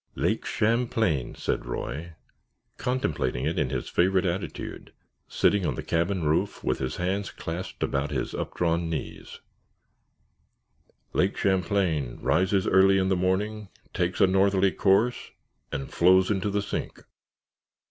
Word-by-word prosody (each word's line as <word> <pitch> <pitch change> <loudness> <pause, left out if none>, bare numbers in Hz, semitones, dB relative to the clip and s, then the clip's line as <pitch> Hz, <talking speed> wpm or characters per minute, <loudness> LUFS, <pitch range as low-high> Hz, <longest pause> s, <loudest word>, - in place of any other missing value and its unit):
"Lake - - 0
Champlain," 110 - 0
said - - -2
Roy, 75 +7 -5 0.6
contemplating 80 - -1
it 80 +4 0
in 70 -4 0
his 65 -2 -3
favorite 95 +2 +2
attitude, 90 +2 -4 0.3
sitting 100 -2 +2
on - - -1
the - - -5
cabin 85 +2 0
roof 75 +1 0
with - - 0
his 65 -1 -3
hands 95 +3 -1
clasped 85 +3 -5
about 70 +1 -1
his - - -3
updrawn 85 -1 -1
knees; 80 -3 -6 1.7
"Lake 95 +2 +1
Champlain 90 -8 0
rises 95 +3 +2
early 95 0 +5
in 95 0 +1
the 95 - +3
morning, 100 +3 -1 0.2
takes 90 +1 -1
a - - +7
northerly 95 0 +3
course, 105 +6 +2 0.4
and 70 - -5
flows 95 +3 +5
into 100 0 0
the 100 0 -1
sink. - - -5
95 Hz, 130 wpm, -26 LUFS, 80-100 Hz, 1.7 s, a